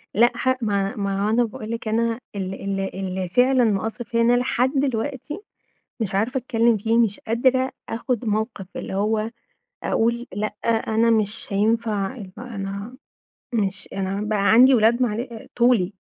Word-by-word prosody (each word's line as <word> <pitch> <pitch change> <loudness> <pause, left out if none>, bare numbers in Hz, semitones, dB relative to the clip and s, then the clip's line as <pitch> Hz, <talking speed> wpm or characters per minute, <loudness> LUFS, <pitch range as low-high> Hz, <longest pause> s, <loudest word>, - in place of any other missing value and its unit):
لأ، 240 +4 +5
ح 260 +1 +2
ما 200 -2 0
ما 200 0 -1
أنا 240 +2 +3
باقول 225 -1 -6
لِك 230 0 -4
أنا 230 +1 +1 0.2
ال 190 -1 -3
ال 195 0 -3
اللي 190 -1 -3
فعلًا 250 +5 +4
مأثر 220 +2 0
فيَّ 230 0 0
إن 235 +1 +4
أنا 245 - +4
لحد 250 0 +1
دلوقتي 270 +2 -2 0.6
مش 205 -4 -2
عارفة 230 +7 +1
أتكلم 235 -2 +2
فيه، 225 +3 +1
مش 225 -4 +2
قادرة 255 +3 +1 0.2
آخد 235 +1 -2
موقف، 215 -1 -1
اللي - - -5
هو 215 +2 0 0.5
أقول 235 +2 0
لأ، 210 +2 -2
أنا 225 0 +2
مش 215 -1 0
هينفع 215 +1 0
يبقى 205 +1 -9
أنا 200 +4 -5 0.6
مش 200 -4 -1
أنا 195 +1 -2
بقى 210 -1 +1
عندي 255 +4 +7
أولاد 235 +1 +4
معل 235 0 -2
طولي، 235 -6 +3
225 Hz, 155 wpm, -23 LUFS, 200-240 Hz, 0.6 s, عندي